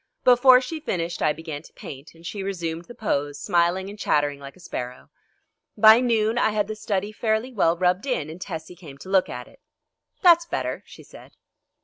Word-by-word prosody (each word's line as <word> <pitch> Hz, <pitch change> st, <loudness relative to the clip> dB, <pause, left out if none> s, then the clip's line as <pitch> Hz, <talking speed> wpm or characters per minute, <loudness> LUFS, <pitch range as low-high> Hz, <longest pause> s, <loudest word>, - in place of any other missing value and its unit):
Before 250 Hz, +1 st, +7 dB
she 310 Hz, +5 st, -5 dB
finished 175 Hz, -, -3 dB
I -, -, +3 dB
began 150 Hz, -1 st, -6 dB
to -, -, -17 dB
paint, 140 Hz, +4 st, -11 dB
and 165 Hz, +1 st, -17 dB
she 200 Hz, +3 st, -5 dB
resumed 170 Hz, -4 st, -4 dB
the 240 Hz, -, -12 dB
pose, 145 Hz, -8 st, -2 dB
smiling 175 Hz, +4 st, +1 dB
and 205 Hz, +1 st, -10 dB
chattering 145 Hz, -6 st, +1 dB
like 140 Hz, 0 st, -10 dB
a -, -, -19 dB
sparrow. 125 Hz, -7 st, -7 dB, 0.7 s
By 220 Hz, +2 st, +8 dB
noon 230 Hz, -2 st, +1 dB
I -, -, +3 dB
had 210 Hz, -1 st, 0 dB
the 215 Hz, -, -4 dB
study 205 Hz, -1 st, -2 dB
fairly 220 Hz, +3 st, -1 dB
well 175 Hz, -6 st, +2 dB
rubbed 180 Hz, +6 st, +1 dB
in 250 Hz, -, -1 dB
and 165 Hz, +3 st, -10 dB
Tessie 165 Hz, -2 st, -6 dB
came 155 Hz, -6 st, -12 dB
to 185 Hz, -, -12 dB
look 190 Hz, -1 st, +3 dB
at 125 Hz, 0 st, -7 dB
it. -, -, -20 dB, 0.6 s
"That's 340 Hz, -2 st, +6 dB
better," -, -, -3 dB
she -, -, -13 dB
said. -, -, -15 dB
185 Hz, 200 wpm, -24 LUFS, 160-220 Hz, 0.7 s, By